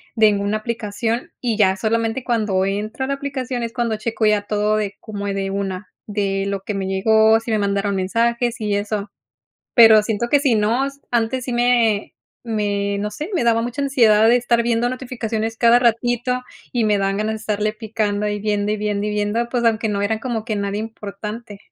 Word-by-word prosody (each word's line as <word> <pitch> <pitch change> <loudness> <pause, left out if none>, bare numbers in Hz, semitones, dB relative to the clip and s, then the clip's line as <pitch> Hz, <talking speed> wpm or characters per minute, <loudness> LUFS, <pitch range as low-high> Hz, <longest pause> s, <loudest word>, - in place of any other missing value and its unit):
de 220 -2 +5
ninguna 200 +1 0
aplicación 230 +1 -3
y 235 -3 -1
ya 190 -3 +3
solamente 225 +3 -1
cuando 210 -6 +1
entro 210 +6 -2
a - - -5
la 275 - 0
aplicación 265 -3 -4
es 230 - -3
cuando 235 -2 -1
checo 220 +1 -2
ya 210 -1 +3
todo 210 +1 0
de 205 -2 -2
como, 205 -2 -6
eh, 200 - -1
de 195 0 -2
una 195 -1 -4 0.2
de 195 -2 -1
lo 200 -1 -2
que 210 - -4
me 195 -1 -3
llegó, 220 +3 +4
si 225 +1 -9
me 215 - +2
mandaron 200 0 0
mensajes 235 +5 0
y 210 -2 -1
eso, 205 0 -2 0.7
pero 225 -3 +8
siento 220 +2 -2
que 285 - +4
si 275 -5 +2
no, 230 +6 +1 0.2
antes 240 +1 0
sí 250 - -2
me 240 -4 +2 0.3
me 205 -3 -1
no 210 +1 -2
sé, 295 - -6
me 340 - +1
daba 230 -1 +3
mucha 245 +4 -3
ansiedad 225 -6 +4
de 240 - +6
estar 240 -1 +2
viendo 235 0 +1
notificaciones 230 -3 -3
cada 235 0 +5
ratito 245 +1 +1 0.3
y 240 -3 +1
me 210 -1 +3
dan 195 0 0
ganas 215 +1 -1
de - - -4
estarle 215 0 -1
picando 215 -1 -2
y 205 0 -2
viendo, 205 0 -1
y - - -1
viendo, 210 0 -1
y - - -1
viendo, 210 +3 -1
pues, 240 -1 -1
aunque 225 -1 +2
no 200 -1 -1
era 220 +2 0
como 230 -3 -3
que 220 - -1
nadie 200 0 -2
importante. 210 0 -7
220 Hz, 205 wpm, -20 LUFS, 205-235 Hz, 0.7 s, pero